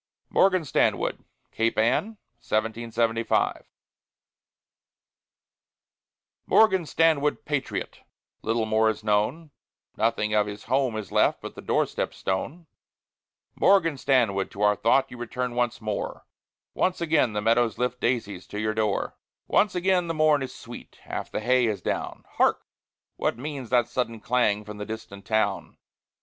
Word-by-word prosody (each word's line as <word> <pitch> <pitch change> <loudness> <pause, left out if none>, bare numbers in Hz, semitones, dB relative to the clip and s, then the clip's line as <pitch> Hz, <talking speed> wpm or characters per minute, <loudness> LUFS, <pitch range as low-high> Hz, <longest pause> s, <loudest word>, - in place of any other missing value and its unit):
MORGAN 185 -4 +3
STANWOOD - - 0 0.3
CAPE 115 0 0
ANN, 110 +2 +3 0.4
1775 115 0 0 2.8
Morgan 190 -7 +4
Stanwood, 155 -3 +2
patriot! 130 -10 -3 0.4
Little 115 0 0
more 110 0 +3
is 110 0 -4
known; 110 +10 0 0.4
Nothing 110 -1 0
of 105 -1 +3
his 105 0 -7
home 130 -4 0
is 110 - -6
left - - +3
But - - -8
the - - -10
door - - +1
step - - -4
stone. 140 - -3 0.9
Morgan 170 -6 +3
Stanwood, 120 -8 +1
to 105 - -4
our 105 0 +4
thought 130 +6 +2
You 125 - -8
return 125 +1 -3
once 120 -1 0
more; 105 -2 -4 0.5
Once 185 0 0
again 155 -8 +2
the 105 - -1
meadows 115 0 +2
lift 125 0 -1
Daisies 110 -6 -1
to 105 - -6
your 110 0 0
door. 110 -2 -1 0.3
Once 205 -2 +2
again 180 -1 +2
the 165 - -2
morn 155 -2 +4
is 135 - -4
sweet, - - -11
Half - - -5
the - - -3
hay 125 +1 +3
is 105 -4 -3
down, - - -3
Hark! - - +2 0.5
what - - -1
means 135 -2 -6
that 120 -2 +3
sudden 120 -2 -2
clang 105 -3 +1
From 105 0 -8
the 105 - -5
distant 110 -3 -8
town? 110 -1 -1
115 Hz, 140 wpm, -26 LUFS, 110-140 Hz, 2.8 s, Morgan